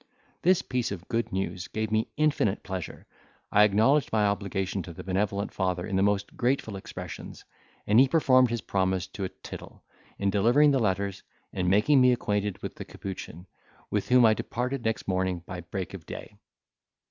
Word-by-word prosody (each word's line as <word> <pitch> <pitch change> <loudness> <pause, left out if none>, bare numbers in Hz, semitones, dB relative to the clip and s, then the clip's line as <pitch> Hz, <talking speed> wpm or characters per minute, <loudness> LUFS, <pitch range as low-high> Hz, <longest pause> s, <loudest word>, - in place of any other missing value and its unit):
This 185 +1 +3
piece 125 -4 -2
of 95 -2 -6
good 115 0 -1
news 95 -1 -3
gave 110 +1 -3
me 110 0 +1
infinite 145 -9 +1
pleasure; 95 -3 -6 0.5
I 105 - +6
acknowledged 115 +8 +3
my 110 -2 +3
obligation 100 -1 -1
to 85 0 -9
the - - -9
benevolent 100 +2 -1
father 90 -2 -1
in 95 - -3
the 95 - +3
most 100 0 0
grateful 120 -4 0
expressions; 95 - -8 0.4
and 105 +3 +5
he 135 - +7
performed 130 -4 +4
his 120 0 -2
promise 95 -1 0
to 100 - -4
a - - -4
tittle, - - -11 0.3
in 100 0 0
delivering 120 +9 +4
the 135 - +2
letters, 100 -2 -1 0.3
and 90 -1 0
making 110 +8 +4
me 125 0 +6
acquainted 105 -4 -1
with - - -6
the - - -6
capuchin, 90 -2 -8 0.5
with 105 +3 -1
whom 125 -1 +6
I 110 - +6
departed 125 +3 -3
next 115 0 -2
morning 95 -2 -1
by 90 0 -6
break 95 +3 -5
of 90 -6 -9
day. - - -8
100 Hz, 180 wpm, -27 LUFS, 95-120 Hz, 0.5 s, he